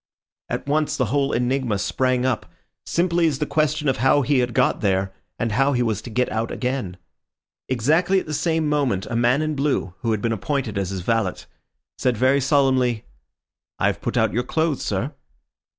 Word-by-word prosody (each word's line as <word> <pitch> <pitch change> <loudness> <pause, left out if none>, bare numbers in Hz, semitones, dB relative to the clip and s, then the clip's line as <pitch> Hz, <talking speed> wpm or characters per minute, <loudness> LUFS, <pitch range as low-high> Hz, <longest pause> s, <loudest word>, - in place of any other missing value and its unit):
At - - -3
once 150 +1 0
the 130 - +1
whole 140 -1 +2
enigma 125 -3 0
sprang 130 +5 0
up, 130 -4 -1 0.4
simply 170 -1 +2
as 145 -4 0
the 150 - -1
question 150 0 0
of 135 - +2
how 135 +4 +3
he 140 +1 +2
had 125 -2 -1
got - - +2
there, 95 -1 0 0.2
and 115 -1 -1
how 135 +6 +2
he 125 -1 +1
was 110 -3 -1
to - - -9
get 125 +3 +1
out 110 +1 -1
again. 125 -8 -3 0.7
Exactly 155 - +2
at - - -7
the 155 - -5
same 160 +1 0
moment 140 -10 0
a - - -1
man 120 +5 +3
in 155 0 -1
blue, 140 -10 -1
who 115 - -2
had 110 -2 +1
been 115 -1 +1
appointed 125 0 -2
as 100 -2 -1
his 95 -1 -4
valet, 110 -1 0 0.6
said 125 -3 +1
very 130 +4 +3
solemnly— 130 -4 +2 0.7
"I - - 0
have - - 0
put - - -2
out - - +2
your 120 - +1
clothes, 155 +3 -1
sir." 110 +9 -2
130 Hz, 195 wpm, -22 LUFS, 115-145 Hz, 0.7 s, how